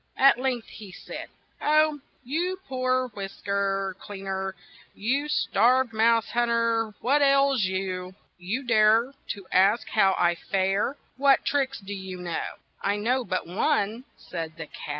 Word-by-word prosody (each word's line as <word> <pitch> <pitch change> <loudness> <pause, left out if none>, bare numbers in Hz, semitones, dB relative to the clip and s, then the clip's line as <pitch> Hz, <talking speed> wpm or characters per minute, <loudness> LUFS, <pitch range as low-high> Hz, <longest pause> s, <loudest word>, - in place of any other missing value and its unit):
At 275 -2 +6
length 255 -3 -1
he 210 -4 -11
said: - - -8 0.3
"Oh, 305 0 +3 0.2
you 345 +8 -2
poor 255 -1 0
whisk 195 -3 -8
er 195 -1 0
clean 195 -1 -9
er, 190 0 -3 0.4
you 270 +8 0
starved 245 -1 +2
mouse 225 0 +3
hunt 240 0 +1
er, 230 -2 +1
what 280 +4 +3
ails 275 -5 +4
you? 185 -1 -3 0.2
You 200 +10 -3
dare 225 +2 +4
to 200 -2 -6
ask 205 +4 +3
how 195 -3 +3
I 175 0 +3
fare! 195 +8 -1 0.2
What 275 0 +4
tricks 270 -2 0
do 200 0 -7
you 190 -2 -6
know? 175 -2 -4
' - - -43
' - - -35
"I - - 0
know 245 +5 +1
but 185 -7 -2
one," 215 - 0
said 165 -2 -6
the 160 - -6
cat. 150 - -10
220 Hz, 160 wpm, -26 LUFS, 195-260 Hz, 0.4 s, At